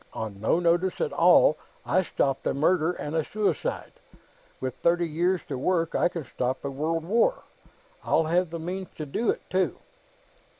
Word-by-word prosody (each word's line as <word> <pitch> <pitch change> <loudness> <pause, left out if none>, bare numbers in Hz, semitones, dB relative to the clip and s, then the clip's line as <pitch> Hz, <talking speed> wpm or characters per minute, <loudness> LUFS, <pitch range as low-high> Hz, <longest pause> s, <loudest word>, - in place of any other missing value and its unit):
On 105 -3 -6
no 115 +9 +2
notice 175 +2 +1
at - - -1
all, 170 -2 +5 0.3
I 185 - +3
stopped 135 -6 -1
a - - 0
murder 160 +3 +2
and 150 -2 -5
a 160 - +2
suicide. 200 -2 -2 0.7
With 130 -1 -4
thirty 170 0 +2
years 175 +4 0
to 130 - -4
work, 165 +2 0
I - - +2
can 170 -2 -5
stop 130 +2 -3
a 140 - -2
world 160 +4 -2
war. 235 - +2 0.6
I'll 165 - +2
have 175 +2 +1
the 170 - -5
means 180 +3 -5
to 155 - -5
do 220 +11 -1
it, - - -2
too." 185 0 0
165 Hz, 175 wpm, -26 LUFS, 150-180 Hz, 0.7 s, all